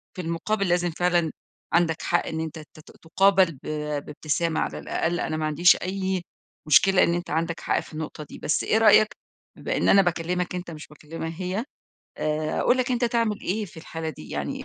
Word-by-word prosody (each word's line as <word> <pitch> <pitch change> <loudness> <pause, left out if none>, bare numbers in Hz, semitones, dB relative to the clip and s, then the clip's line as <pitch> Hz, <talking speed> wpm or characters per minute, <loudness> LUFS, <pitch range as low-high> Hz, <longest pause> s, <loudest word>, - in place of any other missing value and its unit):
في 185 - -4
المُقابل 185 +5 -1
لازم 175 -1 +1
فعلًا 175 -1 +1 0.4
عندك 170 -1 +2
حق 175 - 0
إن 160 - -3
أنت 160 0 -5
ت 155 0 -14
ت - - -15
تُقابَل 190 +1 +4
ب 135 - -14 0.5
بابتسامة 155 +2 -1
على - - -2
الأقل. 170 +2 -1
أنا 155 0 -2
ما 155 - -1
عنديش 160 +4 +5
أي 190 -1 -2 0.4
مشكلة 190 +5 +5
إن 170 - +2
أنت 175 0 -3
عندك 165 +2 -1
حق - - 0
في - - -11
النقطة 155 -1 -6
دي، - - -11
بس - - 0
إيه 220 - +2
رأيك 215 -1 +6 0.5
بما - - -2
إن - - +2
أنا 195 - +7
باكلّمك 180 0 -1
أنت 175 -1 -5
مش 150 -2 -9
باكلّمها 160 +2 -7
هي، 190 +6 -2 0.5
آآ 155 0 -1
أقول 250 - +3
لك 255 0 0
أنت 245 0 +1
تعمل 230 -3 0
إيه 210 +4 -2
في 175 - -14
الحالة 160 0 -6
دي؟ 75 - -12
يعني - - -4
170 Hz, 195 wpm, -25 LUFS, 160-190 Hz, 0.5 s, أنا